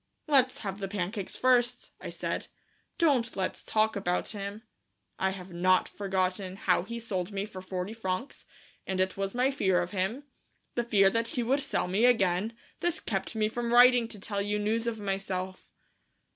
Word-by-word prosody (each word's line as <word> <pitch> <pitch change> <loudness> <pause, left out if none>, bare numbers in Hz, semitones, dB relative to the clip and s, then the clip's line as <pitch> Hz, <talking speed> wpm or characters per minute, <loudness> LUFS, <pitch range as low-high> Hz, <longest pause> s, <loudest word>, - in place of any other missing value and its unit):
"Let's 265 -4 +3
have 195 -2 -4
the 195 - -3
pancakes 195 +1 -3
first," 250 -1 +2
I - - -5
said; - - -3 0.5
"don't 265 -9 +2
let's 190 -1 -2
talk 220 0 +1
about 180 -3 -1
him. 205 +1 -5 0.6
I 190 - +2
have 185 -1 -7
not 185 +2 +3
forgotten 190 -1 -1
how 185 -2 +2
he 235 +6 -6
sold 200 -4 -3
me 200 0 -2
for 190 -3 -9
forty 185 +2 -4
francs, 225 +4 -4 0.4
and 190 -1 -1
it 190 0 +1
was 195 +2 -3
my 255 +2 +3
fear 190 -9 +2
of 175 0 -2
him, 205 +8 -1 0.5
the 240 - 0
fear 200 -4 +4
that 230 +1 0
he 245 - -1
would 265 +5 +2
sell 275 -8 -1
me 195 +6 +2
again, 215 -2 +2 0.2
that 345 -2 -1
kept 195 +1 -2
me 215 -1 +2
from 235 +1 -3
writing 245 -1 +7
to 215 -2 -7
tell 200 0 -2
you 205 +1 0
news 220 +3 0
of 225 -2 -2
myself." 190 -2 -3
205 Hz, 180 wpm, -29 LUFS, 190-235 Hz, 0.6 s, writing